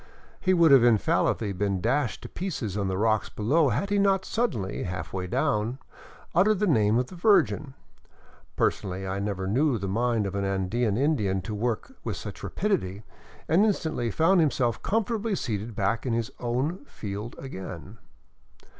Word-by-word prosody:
He 185 - +1
would 165 -3 +5
infallibly 115 -4 +4
have 95 -2 -6
been 100 -2 0
dashed 135 +5 0
to - - -6
pieces 145 - -4
on 100 -2 -1
the 95 0 -1
rocks 110 +1 +1
below, 140 +8 +2
had 195 - -1
he 205 - +3
not 195 -1 +2
suddenly, 115 - -1
halfway 90 0 -4
down, 105 +6 0 0.6
uttered 200 +5 +4
the 210 - +1
name 110 - +3
of 125 - +1
the 180 - -12
Virgin 170 -7 +2 0.4
— - - -28
personally 95 -1 -1
I 95 +1 -2
never 100 -2 -2
knew 130 +6 +2
the 100 -1 -4
mind 115 +2 +1
of 100 - -3
an 100 0 -1
Andean 100 +3 0
Indian 115 -9 +1
to 110 - -5
work 115 - -2
with - - -3
such - - -8
rapidity 110 - -2 0.2
— - - -23
and 170 +6 +4
instantly 160 - 0
found 165 - +3
himself 130 -6 +1
comfortably 220 0 0
seated 110 - -3
back 100 +3 0
in 120 - 0
his 115 -1 -1
own 130 - -2
field 105 - -6
again. 95 -4 -8
115 Hz, 170 wpm, -27 LUFS, 100-160 Hz, 0.6 s, would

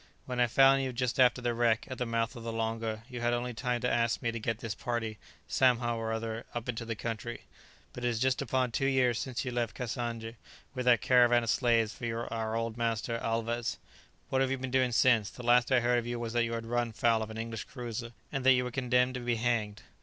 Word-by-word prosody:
When 125 -1 -4
I 120 - +4
found 135 +3 +5
you 130 -1 -2
just 125 0 -2
after 125 -1 +4
the 120 -1 +1
wreck, 115 -1 +2
at 130 - -7
the 125 - -1
mouth 115 +1 -1
of 120 - -8
the 115 0 -4
Longa, 115 -1 -2
you 125 -2 -7
had 120 0 +1
only 120 0 -3
time 120 +1 -2
to 125 - +1
ask 115 0 +1
me 120 -2 -1
to 115 - -5
get 115 0 -2
this 115 -2 -4
party, 115 -2 -3 0.3
somehow 120 -2 +2
or 110 0 -3
other, 110 0 -4
up 120 0 -4
into 115 -1 -3
the 115 0 -3
country. 115 +2 -5 0.5
But 125 - -7
it - - +2
is 120 -2 0
just 130 +3 +1
upon 130 -1 0
two 135 +4 0
years 125 -3 +2
since 130 0 -3
you 125 - -2
left 120 -2 -2
Cassange 115 -2 -4 0.4
with 130 -2 -3
that 120 -2 +5
caravan 120 -1 +5
of 115 - +1
slaves 115 -2 +2
for 115 -1 -4
our 110 -1 -2
old 115 0 -2
master 115 0 -1
Alvez. 115 +1 -2 0.5
What 130 - +1
have 135 - +2
you 135 - 0
been 130 0 -5
doing 130 -1 +2
since? 115 -3 +4
The 125 - -11
last 120 +1 +4
I 130 -2 +5
heard 120 0 +3
of 120 - -6
you 120 0 -3
was 115 -1 -4
that 120 -1 +2
you 115 - -3
had 115 0 -3
run 120 0 -1
foul 115 0 +2
of 110 - -4
an 110 - -7
English 115 -1 -5
cruiser, 120 -2 -6 0.2
and 135 -2 -2
that 130 0 +7
you 125 0 +2
were 125 - -4
condemned 125 0 +2
to 125 - -4
be 120 -1 0
hanged." 110 -2 -1
120 Hz, 250 wpm, -30 LUFS, 115-125 Hz, 0.5 s, that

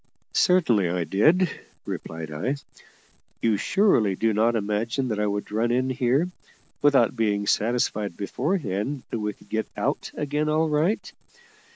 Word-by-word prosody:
"Certainly 125 - +3
I 90 0 0
did," 155 - +3 0.4
replied 80 -1 -6
I. 110 - -1 0.8
"You 115 -2 +2
surely 110 - +2
do 110 +3 +1
not 115 +3 +2
imagine 110 +5 -1
that 105 -2 -2
I 105 - +1
would 100 0 -3
run 115 +3 +1
in 130 +2 +1
here, 130 +5 +1 0.5
without 135 -5 +4
being 105 -3 0
satisfied 105 -3 0
beforehand 130 - -2
that 115 - -2
we 105 0 -2
could 100 - -22
get 110 0 -1
out - - -1
again 150 +1 -1
all 155 +1 +2
right. 155 +8 0
115 Hz, 145 wpm, -25 LUFS, 105-145 Hz, 0.8 s, without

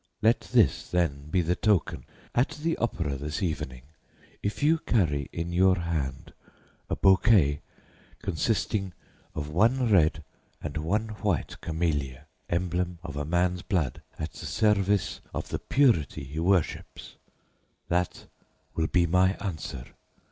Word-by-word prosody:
Let 115 +2 +5
this, - - +3
then, 75 -5 0
be 90 +3 +2
the 85 +2 +1
token. 100 -5 +1 0.3
At 125 +4 +2
the 165 0 +1
opera 85 -11 -1
this 75 +6 -4
evening, 75 -7 -3 0.6
if 105 +6 -3
you 160 +2 +4
carry 75 - +1
in 85 +1 -4
your 95 +1 +4
hand 80 -6 -3 0.6
a - - 0
bouquet 95 -7 +4 0.6
consisting 95 +1 -1 0.4
of 75 -1 -3
one 115 +7 +3
red 80 -6 +4 0.4
and 75 0 -5
one 105 +9 -1
white 100 -6 -1
camellia 75 -6 -2 0.2
emblem 90 0 -1
of 75 -6 -6
a 75 0 -2
man's 90 +2 +1
blood 80 - -1 0.2
at 80 - -5
the - - -7
service 105 -3 +1
of - - -4
the - - -2
purity 115 - +2
he 70 +4 -6
worships 90 -1 -1 0.7
that 90 +1 -1 0.5
will 80 -1 0
be 90 0 +3
my 90 +3 +3
answer. 80 -10 -5
90 Hz, 135 wpm, -27 LUFS, 75-100 Hz, 0.7 s, Let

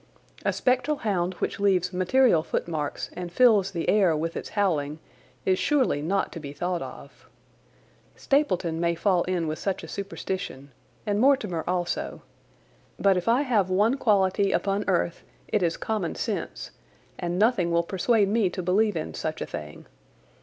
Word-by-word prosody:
A - - +2
spectral 255 +4 +1
hound 185 -6 -1
which - - -3
leaves 185 -2 +2
material 185 +1 +3
footmarks 155 -2 -3
and 180 -1 -6
fills 210 -2 +4
the 170 -4 -4
air 190 -6 +4
with 165 +2 -3
its - - -5
howling 155 -7 +1 0.5
is 185 -1 +2
surely 265 - +2
not 190 +6 0
to 170 - -7
be 145 -2 -8
thought 175 +3 -2
of. - - -10 0.9
Stapleton 185 - 0
may 170 0 +1
fall 180 +1 +2
in 180 -2 -1
with 155 0 -3
such 195 -3 -2
a - - -7
superstition, 190 -7 -5 0.3
and 205 -1 0
Mortimer 215 - +2
also, 175 -1 -2 0.7
but 195 -1 +3
if 180 +2 -2
I 240 +5 +4
have 215 -9 +1
one 210 +7 +3
quality 200 -5 +2
upon 200 +1 0
earth 170 -2 0 0.3
it 210 - 0
is 170 -2 0
common 210 -6 -2
sense, - - -4 0.5
and 175 -1 -2
nothing 210 -4 +3
will 170 0 +2
persuade 200 +4 +2
me 210 -2 +2
to 185 +1 -5
believe 205 +3 +2
in 155 - -4
such 160 0 -4
a - - -3
thing. 75 0 -8
185 Hz, 160 wpm, -26 LUFS, 170-210 Hz, 0.9 s, fills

